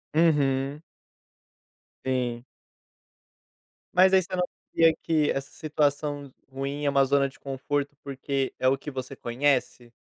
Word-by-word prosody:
Uhum. 145 -3 +2 1.2
Sim. 125 -2 -1 1.5
Mas 185 +1 +6
aí 190 - +7
você 185 +2 -9
não 180 - +1 0.3
crê 165 -1 +5
que 155 -2 +2
essa 135 0 -4
situação 145 -2 -1 0.2
ruim 140 +2 -4
é - - +4
uma 140 -1 +4
zona 140 +1 +3
de 135 - -14
conforto 140 +1 -3
porque 135 -1 -2
é 130 - +1
o 135 - +2
que 150 - -7
você 135 -1 -6
conhece? 125 -1 0
140 Hz, 130 wpm, -27 LUFS, 135-150 Hz, 1.5 s, aí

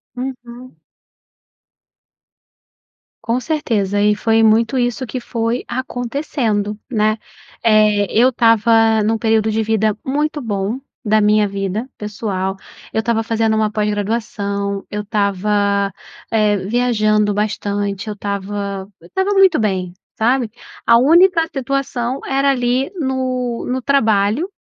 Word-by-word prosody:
Uhum. 250 -1 -7 2.5
Com 230 +2 0
certeza 220 -10 -1
e 210 0 +3
foi 225 +1 +2
muito 225 +4 +3
isso 245 +1 -1
que 255 - -4
foi 230 0 -2
acontecendo, 240 -4 -2
né, 215 -1 +1 0.5
eh, 215 -2 +4
eu 240 +4 +4
estava 225 -2 +4
num 225 +1 +1
período 220 -1 +1
de 220 +1 0
vida 215 -1 +1
muito 295 +3 -1
bom, 210 +1 -2 0.3
da 215 +1 +4
minha 210 0 +3
vida 200 +4 -3
pessoal, 200 -2 -3 0.4
eu 220 - +1
estava 225 0 0
fazendo 225 -1 +1
uma 215 -1 +1
pós-graduação, 205 -1 -2
eu 210 - -2
estava, 200 -1 0 0.4
eh, 210 -2 +2
viajando 215 0 +1
bastante, 205 -1 -2
eu 210 - -3
estava 200 -1 -4
eu 170 - -16
estava 380 - -1
muito 380 -6 +5
bem, 185 -4 -1 0.2
sabe. 240 +1 +1 0.4
A 230 - +6
única 335 +6 +5
situação 265 -1 -2
era 275 +1 +1
ali 255 +2 0
no 255 -3 -2
no 260 0 -1
trabalho, 230 - +2
220 Hz, 120 wpm, -18 LUFS, 205-250 Hz, 2.5 s, A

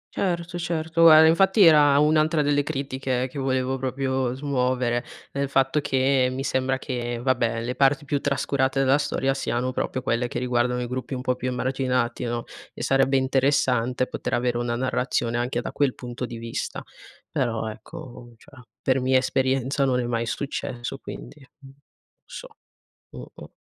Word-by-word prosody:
Certo, 175 -2 -2
certo. 165 -1 +3
Eh, 155 0 +8
infatti, 190 +5 +4
era 150 -4 +6
un'altra 155 +1 +3
delle 145 0 +2
critiche 135 -3 -2
che 140 - -6
volevo 130 0 -1
proprio 130 -1 -1
smuovere, 125 -3 0 0.3
il 140 0 -2
fatto 135 +2 +2
che 130 -1 +2
mi 130 +1 -4
sembra 130 0 0
che, 120 -3 -4
vabbè, 120 -2 0
le 125 +2 -2
parti 135 +2 +2
più 145 0 -1
trascurate 135 -1 0
della 135 +1 +3
storia 135 -2 0
siano 130 -1 -2
proprio 130 0 -3
quelle 120 -1 0
che - - -5
riguardano 125 0 0
i - - -4
gruppi 130 +2 -4
un 125 - -4
po' 125 0 0
più 125 0 -5
emarginati, 125 -1 -1
no, 120 0 -2 0.3
e - - -6
sarebbe 135 0 +3
interessante 130 -2 +1
poter - - -3
avere 120 0 0
una 120 0 -1
narrazione 120 -1 -1
anche 120 0 -1
da - - -5
quel 140 -3 0
punto 125 0 -6
di 120 - -7
vista. 115 0 -5 0.5
Però, 115 -3 -1
ecco, 120 +1 -11
cioè, 130 +4 -18 0.2
per 130 0 +2
mia 130 +1 +3
esperienza 130 +1 0
non 130 -2 +2
è 125 - -1
mai 115 -1 -2
successo, 125 +1 -4
quindi 145 +1 -10 0.2
non 135 -1 -14 0.5
so. - - -9 0.6
Mh, - - -9
mh. - - -11
130 Hz, 165 wpm, -24 LUFS, 125-140 Hz, 0.6 s, Eh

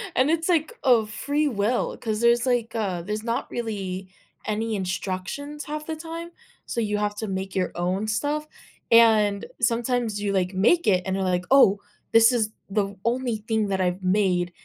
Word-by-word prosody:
And 260 +4 +3
it's 330 +2 0
like, 320 -3 +1
of 235 -5 +4
free 290 +7 -1
will, 230 -1 0
'cause 220 -1 -3
there's 235 +1 +4
like, 240 -3 0
uh, 190 -6 -1
there's 210 +4 -4
not 230 0 -2
really 195 -5 -4 0.4
any 220 +1 -1
instructions 195 +10 -4
half 305 0 -5
the 320 - -4
time, 330 +2 -7 0.3
so 235 - -2
you 210 -1 -1
have 205 0 -1
to 220 - -3
make 190 0 -4
your 185 - 0
own 185 +4 -1
stuff, 290 +8 -1 0.4
and 215 -3 +5 0.2
sometimes 230 -2 0
you 200 -1 -1
like 185 -1 0
make 230 - +3
it 180 -3 +3
and 190 0 -1
you're 195 - -1
like, 180 -1 0
"Oh, 205 -7 +6 0.3
this 225 +1 +6
is 220 -3 +1 0.2
the 200 0 -1
only 240 -1 0
thing 220 -2 +1
that 190 -1 0
I've 180 +1 -1
made, 185 -2 +1
215 Hz, 180 wpm, -25 LUFS, 195-245 Hz, 0.4 s, Oh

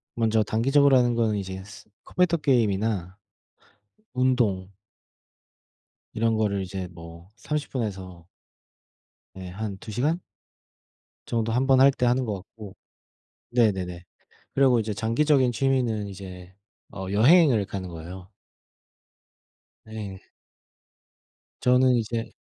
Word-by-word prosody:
먼저 110 -1 +2
단기적으로 135 +6 +3
하는 120 -1 +2
거는 115 -2 +1
이제 95 -1 -5
스 105 +2 -13 0.2
컴퓨터 180 -2 +1
게임이나 105 - 0 1.0
운동 120 -8 +1 1.4
이런 115 0 +1
거를 100 -2 0
이제 95 0 -5
뭐 85 +1 -12
30 150 +7 -4
분에서 95 -8 -5 1.1
네 95 -1 -8
한 100 +1 -5
2 110 - -9
시간 145 - 0 1.1
정도 115 -1 -1
1 125 +3 +1
번 135 -1 +5
할 135 - +8
때 125 - -1
하는 125 +1 +2
것 105 -3 -2
같고 100 +1 -11 0.8
네네네 95 -7 0 0.5
그리고 130 -3 +4
이제 110 -1 -2
장기적인 130 +5 +2
취미는 120 -4 0
이제 95 -2 -10 0.4
어 95 -2 -6
여행을 120 - +5
가는 95 -2 -6
거예요. 90 +3 -9 1.6
네. 105 -3 -8 1.4
저는 125 0 +4
이제 115 0 -2
110 Hz, 210 characters per minute, -25 LUFS, 95-125 Hz, 1.6 s, 할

